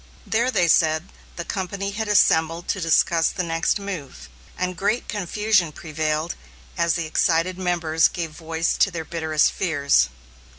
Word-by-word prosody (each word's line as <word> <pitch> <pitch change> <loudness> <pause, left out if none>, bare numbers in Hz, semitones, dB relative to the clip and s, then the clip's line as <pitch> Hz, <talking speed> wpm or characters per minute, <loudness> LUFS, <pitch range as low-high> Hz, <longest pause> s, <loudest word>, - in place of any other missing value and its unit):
There, 235 +3 +1
they 180 -9 +2
said, 160 +1 +2 0.3
the 170 - -5
company 195 +2 -3
had 220 +2 -3
assembled 165 -4 +3
to 195 - -1
discuss 165 0 +3
the 185 - -3
next 165 -1 0
move, 145 - -7 0.3
and 180 0 -2
great 205 +7 -1
confusion 205 -3 +1
prevailed 155 +1 -2 0.4
as 170 -1 +1
the 170 - -2
excited 165 +3 +1
members 170 -3 +2
gave 165 -3 -5
voice 160 +1 -2
to - - +4
their 165 -3 -5
bitterest 160 -2 +1
fears. 140 - +2
170 Hz, 145 wpm, -23 LUFS, 160-190 Hz, 0.4 s, to